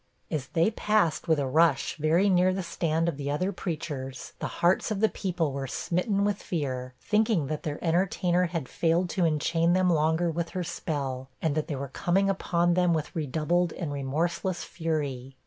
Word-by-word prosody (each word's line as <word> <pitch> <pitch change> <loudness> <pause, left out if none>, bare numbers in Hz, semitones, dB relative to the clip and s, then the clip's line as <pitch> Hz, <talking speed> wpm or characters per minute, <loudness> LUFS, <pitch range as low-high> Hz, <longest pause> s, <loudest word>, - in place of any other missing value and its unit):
As 145 -5 -2
they 170 +7 +2
passed 210 -7 +1
with 160 -2 +4
a 140 - 0
rush 155 +1 +2
very 160 +6 +3
near 185 -1 +3
the 190 - -2
stand 165 -1 0
of 165 -5 -1
the 140 -1 -3
other 180 +7 0
preachers, 150 -7 -5
the - - -2
hearts 175 +6 +1
of 215 -3 -2
the 220 +1 +4
people 175 -6 -1
were 135 0 -3
smitten 195 - 0
with 205 -1 -1
fear, 130 -6 -3
thinking 215 -6 +2
that 150 +2 -3
their 150 -3 -3
entertainer 180 +1 +2
had 165 -6 -3
failed 170 +2 +1
to 180 -3 +1
enchain 165 +2 +2
them 185 -1 +3
longer 160 +2 +2
with 170 +1 -2
her 180 - 0
spell, 140 -6 -4
and 160 -3 0
that 155 0 -1
they 150 - -3
were 140 +1 -4
coming 190 +8 +1
upon 175 -2 +1
them 180 -1 +3
with 155 -1 -4
redoubled 160 +3 0
and 160 -6 -4
remorseless 170 +7 -1
fury. 140 -6 -3
165 Hz, 185 wpm, -28 LUFS, 150-180 Hz, -, with